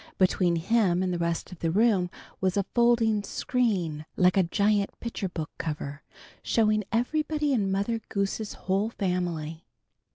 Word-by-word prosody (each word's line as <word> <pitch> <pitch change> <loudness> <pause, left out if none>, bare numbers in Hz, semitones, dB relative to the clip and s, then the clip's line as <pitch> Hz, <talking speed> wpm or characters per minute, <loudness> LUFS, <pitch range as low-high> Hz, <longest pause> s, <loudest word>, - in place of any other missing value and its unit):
Between 180 -2 +3
him 185 0 +2
and 185 -1 0
the 175 - -2
rest 170 +1 -2
of 180 - -10
the 165 - 0
room 195 -1 +3 0.3
was 185 0 0
a 200 - +1
folding 235 -3 +3
screen, 195 - -1
like 180 0 +4
a 195 - +5
giant 200 +3 +1
picture 225 -5 -4
book 165 -3 -5
cover, 150 -2 -4 0.4
showing 215 -2 +2
everybody 300 +4 0
in 200 -6 +1
Mother 200 +4 0
Goose's 200 +1 -2
whole 195 +3 +1
family. 175 -6 -3
195 Hz, 150 wpm, -27 LUFS, 175-225 Hz, 0.4 s, a